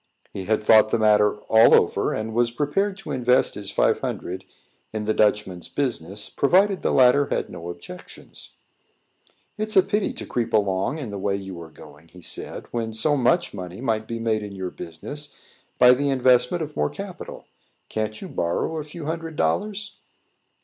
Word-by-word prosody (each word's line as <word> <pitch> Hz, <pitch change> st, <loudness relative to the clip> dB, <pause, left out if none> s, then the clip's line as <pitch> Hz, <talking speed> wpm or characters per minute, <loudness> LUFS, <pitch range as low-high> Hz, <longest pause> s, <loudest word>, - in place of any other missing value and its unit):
He 95 Hz, -, -5 dB
had 110 Hz, +1 st, +1 dB
thought 110 Hz, 0 st, +6 dB
the -, -, +1 dB
matter 105 Hz, -1 st, +4 dB
all 110 Hz, +1 st, +6 dB
over, -, -, +2 dB
and 110 Hz, +1 st, -3 dB
was 120 Hz, +1 st, +2 dB
prepared 155 Hz, +10 st, -1 dB
to 195 Hz, -, -8 dB
invest 125 Hz, 0 st, +2 dB
his 100 Hz, -1 st, -6 dB
five -, -, +2 dB
hundred 90 Hz, +2 st, -4 dB
dollars 95 Hz, -, -26 dB, 0.4 s
in 110 Hz, -1 st, -3 dB
the 110 Hz, -, +1 dB
Dutchman's 105 Hz, -5 st, +1 dB
business, 105 Hz, -, -2 dB
provided 190 Hz, +6 st, +2 dB
the -, -, 0 dB
latter 130 Hz, +2 st, +5 dB
had -, -, -2 dB
no 85 Hz, -1 st, -7 dB
objections. 85 Hz, -, -11 dB, 1.1 s
"It's 215 Hz, -1 st, -1 dB
a 190 Hz, -, +8 dB
pity 210 Hz, +2 st, 0 dB
to -, -, -7 dB
creep 120 Hz, -2 st, -2 dB
along 100 Hz, +5 st, +1 dB
in 130 Hz, -9 st, -6 dB
the 100 Hz, -, -5 dB
way 100 Hz, +1 st, 0 dB
you 95 Hz, -3 st, -7 dB
are 80 Hz, -, -10 dB
going," 75 Hz, 0 st, -15 dB
he 90 Hz, +2 st, -15 dB
said, -, -, -5 dB
"when 115 Hz, -2 st, -3 dB
so 145 Hz, +7 st, +2 dB
much 170 Hz, +7 st, +2 dB
money 90 Hz, -1 st, -7 dB
might 110 Hz, -3 st, -1 dB
be 115 Hz, -, -4 dB
made 115 Hz, -1 st, 0 dB
in 105 Hz, -1 st, -7 dB
your 95 Hz, -2 st, -4 dB
business 145 Hz, -, -7 dB, 0.4 s
by 125 Hz, 0 st, +8 dB
the 140 Hz, +3 st, 0 dB
investment 130 Hz, +4 st, +3 dB
of 150 Hz, -1 st, -8 dB
more 75 Hz, -, +1 dB
capital. -, -, -8 dB, 0.4 s
Can't 110 Hz, 0 st, -3 dB
you -, -, -6 dB
borrow 85 Hz, -, -2 dB
a 155 Hz, -, -3 dB
few 155 Hz, +1 st, -9 dB
hundred 165 Hz, 0 st, -4 dB
dollars?" 205 Hz, -, -1 dB
110 Hz, 185 wpm, -24 LUFS, 100-145 Hz, 1.1 s, a